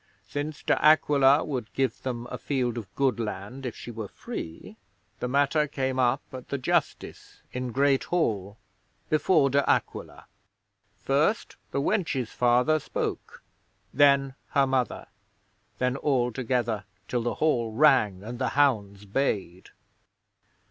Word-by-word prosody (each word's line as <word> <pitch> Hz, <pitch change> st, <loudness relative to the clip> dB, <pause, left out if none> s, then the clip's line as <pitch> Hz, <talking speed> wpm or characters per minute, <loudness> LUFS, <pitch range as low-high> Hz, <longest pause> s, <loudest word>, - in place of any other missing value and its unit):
Since 145 Hz, +6 st, -5 dB
De -, -, +1 dB
Aquila 145 Hz, -2 st, +5 dB
would 130 Hz, -7 st, -4 dB
give 135 Hz, -4 st, -1 dB
them 120 Hz, -2 st, -4 dB
a -, -, -5 dB
field 125 Hz, -4 st, -1 dB
of 100 Hz, -4 st, -11 dB
good 135 Hz, -3 st, +1 dB
land, 110 Hz, +5 st, -5 dB
if 120 Hz, -, -6 dB
she 120 Hz, -, -8 dB
were 110 Hz, -2 st, -6 dB
free, 80 Hz, +1 st, -8 dB, 0.4 s
the -, -, -2 dB
matter 145 Hz, +3 st, +2 dB
came 130 Hz, -2 st, -2 dB
up 130 Hz, +2 st, +2 dB
at 130 Hz, -1 st, -9 dB
the 140 Hz, -, -1 dB
justice 125 Hz, -, -2 dB
in 125 Hz, -1 st, -3 dB
Great 135 Hz, +2 st, +2 dB
Hall 105 Hz, -, -1 dB, 0.5 s
before 155 Hz, -2 st, +3 dB
De 140 Hz, +1 st, +3 dB
Aquila. 75 Hz, +2 st, -1 dB, 0.7 s
First 140 Hz, -, 0 dB
the -, -, -2 dB
wench's 140 Hz, -, -1 dB
father 125 Hz, +6 st, +3 dB
spoke; -, -, -5 dB, 0.5 s
then 140 Hz, -1 st, +4 dB, 0.2 s
her 140 Hz, -1 st, +4 dB
mother; 130 Hz, -2 st, -1 dB, 0.7 s
then 125 Hz, +2 st, 0 dB
all 130 Hz, -4 st, +1 dB
together, 120 Hz, -4 st, -1 dB, 0.2 s
till 125 Hz, -, -1 dB
the 120 Hz, +1 st, -2 dB
hall 120 Hz, -8 st, +1 dB
rang 110 Hz, -7 st, +3 dB
and 120 Hz, +3 st, -7 dB
the 130 Hz, -, 0 dB
hounds 105 Hz, -8 st, +1 dB
bayed. 100 Hz, -6 st, -2 dB
130 Hz, 135 wpm, -27 LUFS, 115-140 Hz, 0.7 s, Aquila